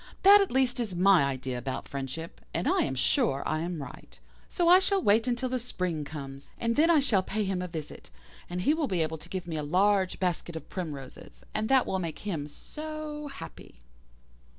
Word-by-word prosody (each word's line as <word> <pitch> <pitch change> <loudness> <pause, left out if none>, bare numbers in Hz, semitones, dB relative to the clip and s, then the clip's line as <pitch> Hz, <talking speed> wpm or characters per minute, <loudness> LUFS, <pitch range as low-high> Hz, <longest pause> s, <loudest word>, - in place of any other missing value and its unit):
That 405 +1 +9
at 395 - +1
least 255 -1 +1
is 215 -7 -2
my 185 -4 +5
idea 130 -2 -3
about 130 +2 -4
friendship, 140 +4 -6
and 170 - 0
I - - +3
am 135 - 0
sure 135 +1 +2
I 155 - 0
am 165 -2 -3
right. - - -12 0.3
So 350 -2 0
I 360 +2 +9
shall 390 +1 +2
wait 220 - +3
till 255 - -1
the 255 0 -1
spring 180 -10 -3
comes, 140 -2 -8
and 230 0 0
then 320 +3 +4
I 330 -3 +6
shall 245 -9 +2
pay 210 +3 -2
him 190 -2 -1
a 180 - -3
visit, 160 -4 -8 0.4
and 180 +1 -3
he 295 - +4
will 315 -2 0
be 180 -7 +1
able 160 0 -4
to - - -12
give 185 -2 -4
me 165 -2 -4
a - - -1
large 185 +5 +2
basket 175 -2 -2
of 160 - -8
primroses 145 -8 -7
and 215 0 -1
that 265 -1 +5
will 190 - -1
make 165 -4 -4
him 160 -8 -2
so 305 - -7
happy. 170 - -11
185 Hz, 210 wpm, -29 LUFS, 155-255 Hz, 0.4 s, That